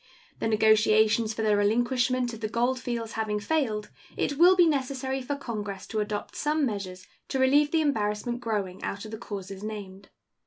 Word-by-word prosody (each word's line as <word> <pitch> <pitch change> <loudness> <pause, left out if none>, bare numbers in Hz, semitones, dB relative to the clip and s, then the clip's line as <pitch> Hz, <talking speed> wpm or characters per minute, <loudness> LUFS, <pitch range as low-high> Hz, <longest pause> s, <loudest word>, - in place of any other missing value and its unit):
The - - -1
negotiations 220 0 +4
for 220 - -2
the 210 -1 +3
relinquishment 245 +4 +1
of 225 - -8
the 220 - -2
gold 245 +4 0
fields 235 -3 -4
having 215 -1 -2
failed, 220 -5 -1 0.3
it 285 0 -1
will 360 +2 +7
be 355 -1 +6
necessary 270 -3 -1
for 285 +3 -3
Congress 210 -7 -5
to 220 - -3
adopt 210 0 -3
some 300 0 +1
measures 190 -5 -5 0.2
to - - -2
relieve 280 +3 +4
the 320 +1 +2
embarrassment 240 -3 -1
growing 205 -6 -3
out 200 +2 -4
of 215 - -9
the 220 - -6
causes 195 -3 -7
named. 200 -2 -7
225 Hz, 180 wpm, -27 LUFS, 210-260 Hz, 0.3 s, will